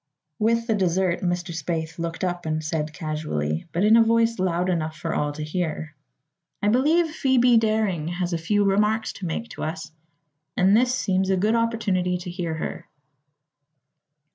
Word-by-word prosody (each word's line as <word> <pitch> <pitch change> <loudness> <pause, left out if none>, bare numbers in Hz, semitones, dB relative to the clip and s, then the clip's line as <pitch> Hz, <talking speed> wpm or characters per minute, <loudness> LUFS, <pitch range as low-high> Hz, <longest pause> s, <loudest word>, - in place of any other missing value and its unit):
With 230 +1 +2
the 230 - +1
dessert 185 -2 +1
Mr. 175 -1 -2
Spaythe 160 0 -4
looked 165 +1 -4
up 175 -2 -2
and 155 0 -1
said 155 0 -2
casually, 150 - -3
but 175 +4 0
in 215 +2 +6
a 230 - +7
voice 230 -1 +2
loud 180 -1 0
enough 160 -3 -1
for - - -3
all 150 0 0
to 150 +1 -5
hear: 155 -1 -3 0.7
"I 205 - +1
believe 310 +8 +3
Phoebe 255 -5 +3
Daring 215 -8 +1
has 175 0 -2
a 165 - -1
few 205 +5 +1
remarks 210 +3 +1
to 185 - -6
make 225 +8 -4
to - - -9
us, 160 0 -5 0.7
and 190 +2 +5
this 250 +2 +3
seems 190 -5 0
a 190 - +2
good 210 +4 +2
opportunity 210 -6 0
to 180 0 -7
hear 175 -3 -3
her." 165 +2 -5
180 Hz, 170 wpm, -24 LUFS, 165-220 Hz, 0.7 s, a